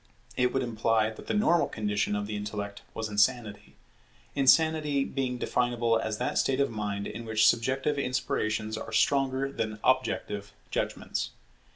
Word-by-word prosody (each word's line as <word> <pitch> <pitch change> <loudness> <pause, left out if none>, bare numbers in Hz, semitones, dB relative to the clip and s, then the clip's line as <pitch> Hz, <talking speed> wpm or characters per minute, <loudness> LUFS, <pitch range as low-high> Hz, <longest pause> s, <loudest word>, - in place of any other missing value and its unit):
It 125 0 +2
would 135 - 0
imply 115 -2 +1
that 110 - -12
the - - -1
normal 175 -5 +3
condition 105 -1 -1
of 105 0 -2
the 105 0 -4
intellect 105 0 -5
was 110 -1 -2
insanity; 105 0 0 0.6
insanity 150 0 +3
being 130 -2 -2
definable 120 -2 +1
as 110 -1 -2
that 125 - 0
state 135 0 +1
of 140 -3 +2
mind 105 -2 -3
in 115 - -6
which 110 0 +2
subjective 130 +6 +1
inspirations 110 -5 -1
are - - -7
stronger 135 -1 +2
than 110 -5 -3
objective 105 -6 0 0.2
judgments. - - -2
115 Hz, 150 wpm, -28 LUFS, 110-135 Hz, 0.6 s, normal